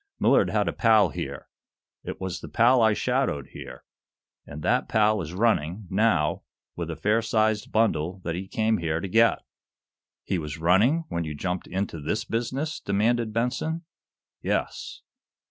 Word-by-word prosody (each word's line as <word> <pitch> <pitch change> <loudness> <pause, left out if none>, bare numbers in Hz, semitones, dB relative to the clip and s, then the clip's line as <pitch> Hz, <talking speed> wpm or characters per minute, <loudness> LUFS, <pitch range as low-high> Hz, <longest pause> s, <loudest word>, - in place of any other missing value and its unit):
"Millard - - +4
had - - +1
a - - -1
pal 110 -5 +4
here. 70 -1 -6 0.6
It - - -6
was 95 -2 -4
the - - -8
pal 120 +2 +4
I 110 -1 +5
shadowed 125 - -1
here. - - -10 0.6
And 75 +1 -8
that - - +1
pal 110 -1 +3
is 85 +1 -6
running, 100 -3 +1
now, 95 -7 +2 0.3
with - - -4
a - - -3
fair 105 +3 +1
sized 110 -1 0
bundle 95 -5 +1
that 85 - -2
he 95 +3 -5
came 110 +1 +1
here 80 -1 -1
to 95 - -4
get." 115 +4 +3 0.8
"He 95 - -1
was 75 -1 -5
running 105 - +3
when 85 - -2
you 75 -2 -5
jumped 90 +4 -3
into 90 -3 -3
this 105 +10 -2
business?" 130 +7 -2
demanded 110 +3 +1
Benson. 125 +9 -1 0.6
"Yes." - - -3
105 Hz, 160 wpm, -26 LUFS, 85-115 Hz, 0.8 s, I